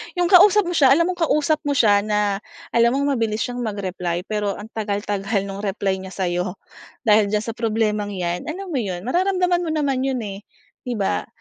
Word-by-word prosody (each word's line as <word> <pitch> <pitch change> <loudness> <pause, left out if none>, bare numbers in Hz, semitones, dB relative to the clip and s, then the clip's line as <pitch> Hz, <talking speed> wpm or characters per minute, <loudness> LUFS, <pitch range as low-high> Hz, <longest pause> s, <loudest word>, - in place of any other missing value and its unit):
'yong 355 -1 +1
kausap 405 +3 +7
mo 350 - -3
siya, 280 -6 +5
alam 335 +2 +2
mong 355 - -8
kausap 305 +1 +2
mo 285 - +2
siya 210 -7 +5
na 210 -2 0 0.3
alam 235 +2 +3
mong 280 +1 +1
mabilis 225 -2 -1
siyang 245 0 -4
magreply 185 -6 -3
pero 210 -1 -2
ang 215 +2 -10
tagal-tagal 205 -1 -2
nong 195 0 -6
reply 195 -1 -1
niya 190 0 -8
sa'yo. 180 0 -2 0.5
Dahil 215 -3 +4
diyan 210 +1 0
sa 230 - -4
problemang 215 -3 -1
'yan, 175 -1 -3
alam 370 +4 -5
mo 280 - 0
'yon 185 -5 -4
mararamdaman 360 - +1
mo 345 -2 -3
naman 280 -4 0
'yon, 255 -3 -2
eh, 200 -2 -6 0.5
'di 245 - -2
ba? 200 -3 -1
215 Hz, 195 wpm, -22 LUFS, 200-280 Hz, 0.5 s, kausap